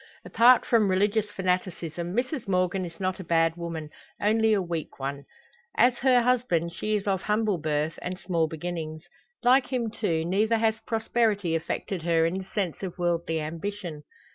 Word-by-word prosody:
Apart 240 +1 +5
from 220 -4 +3
religious 205 +3 +1
fanaticism, 180 -2 -2
Mrs 255 0 -2
Morgan 185 0 +1
is 170 +1 -10
not 185 0 -2
a - - -5
bad 165 -1 +2
woman 165 -3 -6 0.3
only 220 +1 +3
a 210 - +3
weak 170 -6 -4
one. 140 +1 -4 0.5
As 245 +1 +4
her 250 -2 +4
husband, 230 -10 +1
she 215 +4 -1
is 205 - -2
of 195 -2 0
humble 210 -3 0
birth, 150 +1 -1
and 180 +1 -5
small 165 -3 0
beginnings; 160 -1 -5 0.4
like 255 +2 +5
him, 240 -4 -2
too, 165 -8 -1
neither 215 +6 +2
has 220 0 +1
prosperity 220 -5 +1
affected 165 +3 -2
her 165 -1 +2
in 175 +3 -1
the - - -6
sense 195 -4 -3
of 190 -3 -5
worldly 170 -2 0
ambition. 165 +1 -5
185 Hz, 165 wpm, -27 LUFS, 165-220 Hz, 0.5 s, Apart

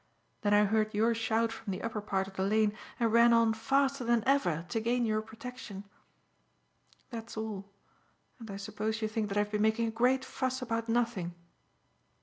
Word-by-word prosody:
Then 205 0 +3
I 210 0 +6
heard 215 0 +1
your 225 +3 +3
shout 225 0 +1
from 225 -1 -8
the 185 - -3
upper 225 -2 -3
part 195 -2 -1
of 190 - -12
the - - -2
lane 210 +2 +2 0.2
and 230 -2 +2
ran 235 0 +7
on 230 -1 +4
faster 270 +4 +1
than 235 -1 +2
ever 180 - +2
to 225 - 0
gain 240 +2 +1
your 215 -1 +1
protection. 220 -2 -8 1.3
That's 230 -1 -7
all, 205 -3 -5 0.7
and 225 -2 -9
I 195 - -5
suppose 215 +2 -3
you - - +2
think 215 -1 -2
that 200 - -2
I - - +5
have 210 0 -3
been 210 -1 0
making 220 +2 +2
a - - -2
great 250 +3 +2
fuss 260 -1 -2
about 230 -2 -2
nothing." 225 -7 0
220 Hz, 190 wpm, -31 LUFS, 210-235 Hz, 1.3 s, ran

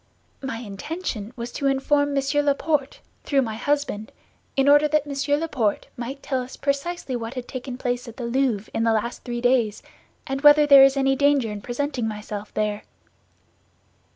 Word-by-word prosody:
"My 265 -4 -4
intention 225 - -5
was 235 0 -6
to 280 - -2
inform 285 +1 +1
Monsieur 275 +1 +1
Laporte, 290 0 0 0.2
through 275 -2 +2
my 220 -3 -4
husband, 245 -3 -2 0.4
in 270 0 +2
order 290 +1 +6
that 300 -1 +1
Monsieur 285 0 0
Laporte 260 -10 -1
might 260 +4 -6
tell 260 -2 -1
us 250 +1 -9
precisely 280 0 -2
what 235 +1 -5
had 250 -1 -5
taken 255 -1 -6
place 245 -1 -2
at 230 - -10
the 245 - -4
Louvre 235 -4 0
in 225 - 0
the 225 -1 +3
last 220 +2 -2
three 240 -1 -4
days, 245 -4 +1 0.4
and 270 0 -3
whether 295 0 +7
there 280 -2 +9
is 270 0 +4
any 270 0 +2
danger 280 -5 +2
in 205 -1 -6
presenting 250 0 -2
myself 210 -1 -6
there." 210 -1 -1
265 Hz, 175 wpm, -24 LUFS, 235-285 Hz, 0.4 s, there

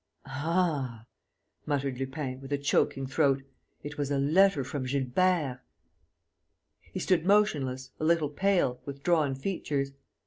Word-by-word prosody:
"Ah!" 145 -6 -1 0.6
muttered 140 -3 -1
Lupin, 135 -1 -4
with 135 +1 -10
a 145 - +2
choking 140 -1 +1
throat. 135 0 +2 0.4
"It 145 0 -7
was 145 -1 -1
a 140 - +1
letter 160 +3 +4
from 130 0 -4
Gilbert!" 140 +2 +1 1.3
He - - -4
stood 180 -4 +2
motionless, 140 -10 +2
a - - -4
little 160 -2 +3
pale, 170 -6 +1
with 140 -1 -8
drawn 155 -6 +2
features. 140 -3 -2
140 Hz, 130 wpm, -29 LUFS, 135-165 Hz, 1.3 s, letter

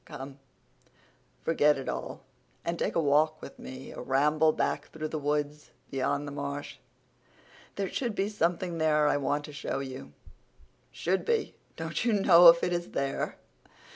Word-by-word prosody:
Come, 135 +1 -9 1.0
forget 150 -3 +3
it 135 - -6
all - - -5 0.4
and 170 0 -2
take - - -1
a - - +3
walk 155 +1 +3
with - - -11
me—a 130 +1 -8
ramble 150 +5 +3
back - - -1
through 155 -1 -5
the 155 - -3
woods 150 0 -2 0.2
beyond 140 +2 -1
the - - -5
marsh. 140 0 -5 1.0
There 200 -1 -1
should 235 +1 -3
be 195 0 0
something 175 -4 -1
there 150 -1 +3
I 145 - +3
want 145 +1 -1
to 150 - -10
show 145 - -3
you." 130 - -7 0.8
"Should 185 +3 -1
be! 460 -2 0 0.2
Don't 160 +2 -3
you 235 -1 +2
know 180 -4 +7
if 170 0 +8
it 180 - +1
is 175 0 -2
there?" 135 0 -2
150 Hz, 160 wpm, -29 LUFS, 140-170 Hz, 1.0 s, if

